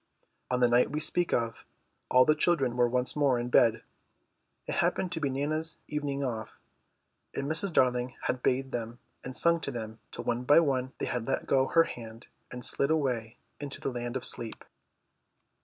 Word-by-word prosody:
On 125 Hz, 0 st, 0 dB
the 120 Hz, -, +6 dB
night 120 Hz, +1 st, +3 dB
we 150 Hz, -, -2 dB
speak 175 Hz, +3 st, +2 dB
of 115 Hz, -1 st, -1 dB, 0.5 s
all 130 Hz, 0 st, +6 dB
the 155 Hz, -, +5 dB
children 150 Hz, -6 st, +1 dB
were 120 Hz, -1 st, +3 dB
once 125 Hz, +1 st, 0 dB
more 140 Hz, -4 st, +2 dB
in 120 Hz, +1 st, -3 dB
bed. 115 Hz, -2 st, +4 dB, 0.8 s
It -, -, -4 dB
happened 180 Hz, -, 0 dB
to 170 Hz, -, -3 dB
be 145 Hz, -3 st, -1 dB
Nana's 155 Hz, +4 st, -2 dB
evening 145 Hz, -2 st, -3 dB
off, 115 Hz, -4 st, -5 dB, 0.8 s
and 140 Hz, -, -2 dB
Mrs. 160 Hz, +6 st, +1 dB
Darling 125 Hz, -3 st, +1 dB
had 125 Hz, -, -2 dB
bathed 130 Hz, +2 st, 0 dB
them 115 Hz, 0 st, -4 dB, 0.3 s
and 130 Hz, 0 st, -5 dB
sung 170 Hz, 0 st, +3 dB
to 145 Hz, -, -3 dB
them 110 Hz, -3 st, -6 dB
till -, -, -7 dB
one 120 Hz, +1 st, -1 dB
by 145 Hz, +5 st, +6 dB
one 130 Hz, -5 st, 0 dB
they -, -, -3 dB
had 120 Hz, -2 st, -3 dB
let 135 Hz, -, -1 dB
go 135 Hz, -1 st, +2 dB
her 165 Hz, -, +5 dB
hand 115 Hz, -5 st, -9 dB, 0.3 s
and 125 Hz, -1 st, -3 dB
slid 140 Hz, -, +4 dB
away 125 Hz, -7 st, -1 dB, 0.2 s
into 145 Hz, -1 st, -6 dB
the 135 Hz, -, -3 dB
land 120 Hz, 0 st, -5 dB
of 130 Hz, -, -2 dB
sleep. 115 Hz, -3 st, 0 dB
130 Hz, 190 wpm, -29 LUFS, 120-145 Hz, 0.8 s, the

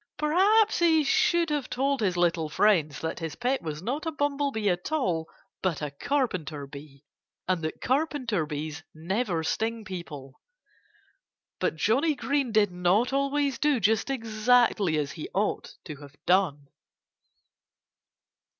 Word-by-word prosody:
Perhaps 395 Hz, +8 st, +3 dB
he 325 Hz, -2 st, +4 dB
should 335 Hz, +3 st, +2 dB
have 295 Hz, -3 st, -2 dB
told 275 Hz, 0 st, 0 dB
his 185 Hz, -4 st, 0 dB
little 165 Hz, -3 st, +1 dB
friends 155 Hz, -4 st, +2 dB
that 160 Hz, 0 st, -3 dB
his 165 Hz, -2 st, -5 dB
pet 255 Hz, +2 st, -1 dB
was 155 Hz, 0 st, -6 dB
not 280 Hz, -, -3 dB
a -, -, 0 dB
bumblebee 280 Hz, -7 st, -1 dB
at 180 Hz, -, -1 dB
all 180 Hz, -, -1 dB, 0.3 s
but 180 Hz, -5 st, 0 dB
a 150 Hz, -2 st, -4 dB
carpenter 165 Hz, -, -2 dB
bee 140 Hz, 0 st, -12 dB, 0.4 s
and 180 Hz, -2 st, 0 dB
that 155 Hz, -, -4 dB
carpenter 255 Hz, -, 0 dB
bees 150 Hz, +1 st, -5 dB
never 175 Hz, +1 st, -1 dB
sting 225 Hz, +6 st, -2 dB
people. 150 Hz, -8 st, -8 dB, 1.2 s
But -, -, 0 dB
Johnnie 275 Hz, -, +2 dB
Green 275 Hz, -3 st, -1 dB
did 210 Hz, -3 st, +3 dB
not 180 Hz, +8 st, +1 dB
always 275 Hz, -1 st, 0 dB
do 295 Hz, -4 st, +2 dB
just 220 Hz, +4 st, +1 dB
exactly 225 Hz, -7 st, +2 dB
as 145 Hz, -2 st, -1 dB
he 155 Hz, -, -7 dB
ought 205 Hz, +2 st, -1 dB
to 155 Hz, -4 st, -7 dB
have 145 Hz, 0 st, -13 dB
done. 170 Hz, -7 st, +2 dB
210 Hz, 140 wpm, -27 LUFS, -, 1.2 s, he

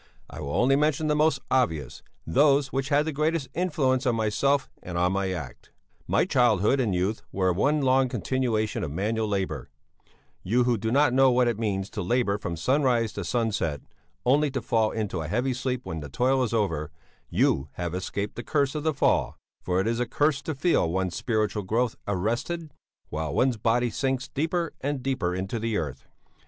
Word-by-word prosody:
I -, -, -8 dB
will 70 Hz, -1 st, -4 dB
only 130 Hz, +3 st, +4 dB
mention 150 Hz, +1 st, +1 dB
the 150 Hz, -1 st, +2 dB
most 150 Hz, -3 st, +2 dB
obvious, 120 Hz, -, 0 dB, 0.2 s
those 140 Hz, -, +3 dB
which 135 Hz, +1 st, -1 dB
had 145 Hz, 0 st, +3 dB
the 160 Hz, -, -1 dB
greatest 155 Hz, -1 st, -1 dB
influence 140 Hz, -7 st, +1 dB
on 120 Hz, -, +2 dB
myself 130 Hz, +6 st, +1 dB
and 90 Hz, -1 st, -5 dB
on 90 Hz, +1 st, +2 dB
my 95 Hz, 0 st, 0 dB
act. 75 Hz, -10 st, -6 dB, 0.4 s
"'My -, -, +2 dB
childhood 120 Hz, +1 st, +3 dB
and 110 Hz, -8 st, +1 dB
youth 95 Hz, +5 st, -1 dB
were 95 Hz, -1 st, +1 dB
one 145 Hz, -, +2 dB
long 130 Hz, 0 st, +3 dB
continuation 120 Hz, -5 st, -1 dB
of 80 Hz, -, -2 dB
manual 110 Hz, +8 st, -1 dB
labour; 95 Hz, -10 st, -2 dB, 0.7 s
you 120 Hz, +7 st, +2 dB
who 120 Hz, -1 st, +2 dB
do 110 Hz, +1 st, -2 dB
not 140 Hz, 0 st, +4 dB
know 135 Hz, 0 st, +5 dB
what 125 Hz, 0 st, +3 dB
it 115 Hz, -2 st, -1 dB
means 100 Hz, -4 st, -1 dB
to 105 Hz, -, -4 dB
labour 105 Hz, +1 st, +1 dB
from 85 Hz, -4 st, -4 dB
sunrise 125 Hz, -, +1 dB
to 100 Hz, -, -4 dB
sunset, 105 Hz, -, -1 dB, 0.4 s
only 145 Hz, +4 st, +3 dB
to 135 Hz, -1 st, -2 dB
fall 110 Hz, -3 st, +2 dB
into 105 Hz, -7 st, -3 dB
a 80 Hz, -, -4 dB
heavy 125 Hz, -, 0 dB
sleep 125 Hz, 0 st, -2 dB
when 80 Hz, -, -5 dB
the 75 Hz, -2 st, -7 dB
toil 130 Hz, -, +2 dB
is 125 Hz, -, 0 dB
over, 85 Hz, -10 st, 0 dB, 0.4 s
you 70 Hz, +2 st, +1 dB
have 85 Hz, -1 st, -4 dB
escaped 100 Hz, +2 st, -3 dB
the 120 Hz, -, -4 dB
curse 140 Hz, -3 st, +1 dB
of 150 Hz, -, -3 dB
the 155 Hz, -1 st, 0 dB
fall, -, -, +1 dB, 0.2 s
for 90 Hz, 0 st, 0 dB
it 95 Hz, -, +1 dB
is 115 Hz, +1 st, 0 dB
a 125 Hz, -, 0 dB
curse 145 Hz, +3 st, +1 dB
to 160 Hz, -, -4 dB
feel 145 Hz, -, +2 dB
one's 95 Hz, 0 st, -1 dB
spiritual 110 Hz, -3 st, 0 dB
growth 115 Hz, +5 st, 0 dB
arrested 120 Hz, -, -2 dB, 0.4 s
while 75 Hz, -1 st, -3 dB
one's 125 Hz, -3 st, +2 dB
body 115 Hz, +2 st, +1 dB
sinks 130 Hz, +1 st, -1 dB
deeper 165 Hz, +3 st, -1 dB
and 140 Hz, -1 st, -2 dB
deeper 100 Hz, -10 st, -1 dB
into 95 Hz, +5 st, -3 dB
the 115 Hz, -1 st, -1 dB
earth. 70 Hz, -5 st, -5 dB
115 Hz, 195 wpm, -26 LUFS, 95-135 Hz, 0.7 s, know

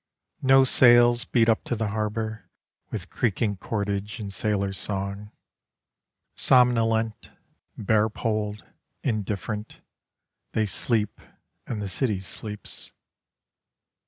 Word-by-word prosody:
No 135 Hz, 0 st, +6 dB
sails 120 Hz, -2 st, +6 dB
beat 115 Hz, -2 st, +2 dB
up 115 Hz, -1 st, +2 dB
to 120 Hz, -, -1 dB
the 110 Hz, -2 st, -2 dB
harbour, 110 Hz, +1 st, -3 dB, 0.4 s
With -, -, -6 dB
creaking 105 Hz, -3 st, 0 dB
cordage 100 Hz, +1 st, -3 dB
and 100 Hz, -2 st, -5 dB
sailors' 100 Hz, -1 st, -1 dB
song. 100 Hz, +1 st, -3 dB, 1.0 s
Somnolent, 115 Hz, -3 st, +2 dB, 0.5 s
bare 110 Hz, +1 st, +2 dB
poled, 105 Hz, -2 st, -3 dB, 0.4 s
indifferent, 105 Hz, -1 st, -3 dB, 0.7 s
They 110 Hz, -, +1 dB
sleep, 105 Hz, +4 st, -1 dB, 0.5 s
and 105 Hz, -4 st, -4 dB
the -, -, -3 dB
city 105 Hz, +1 st, 0 dB
sleeps. 105 Hz, +2 st, -5 dB
110 Hz, 100 wpm, -25 LUFS, 100-115 Hz, 1.0 s, No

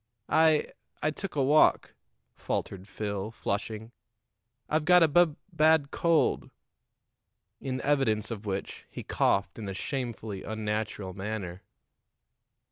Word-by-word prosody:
"I 160 Hz, -1 st, +5 dB, 0.4 s
I 155 Hz, -, +2 dB
took 195 Hz, +4 st, -6 dB
a 140 Hz, -, +2 dB
walk," 150 Hz, +4 st, +4 dB, 0.4 s
faltered 95 Hz, 0 st, -4 dB
Phil, 100 Hz, -1 st, -4 dB
flushing. 110 Hz, +1 st, -4 dB, 0.8 s
"I've 155 Hz, 0 st, +1 dB
got 180 Hz, +1 st, +6 dB
a -, -, +6 dB
bub 160 Hz, 0 st, +4 dB, 0.2 s
bad 155 Hz, -2 st, +4 dB
cold." 170 Hz, -2 st, +1 dB, 1.1 s
In 130 Hz, -1 st, -3 dB
evidence 130 Hz, -7 st, +1 dB
of 105 Hz, -2 st, -6 dB
which, 95 Hz, 0 st, -4 dB
he -, -, -8 dB
coughed 100 Hz, +2 st, 0 dB
in 105 Hz, -3 st, -5 dB
a 95 Hz, -, -5 dB
shamefully 115 Hz, -5 st, -4 dB
unnatural 105 Hz, -2 st, -3 dB
manner. 95 Hz, -2 st, -5 dB
110 Hz, 120 wpm, -29 LUFS, 100-150 Hz, 1.1 s, got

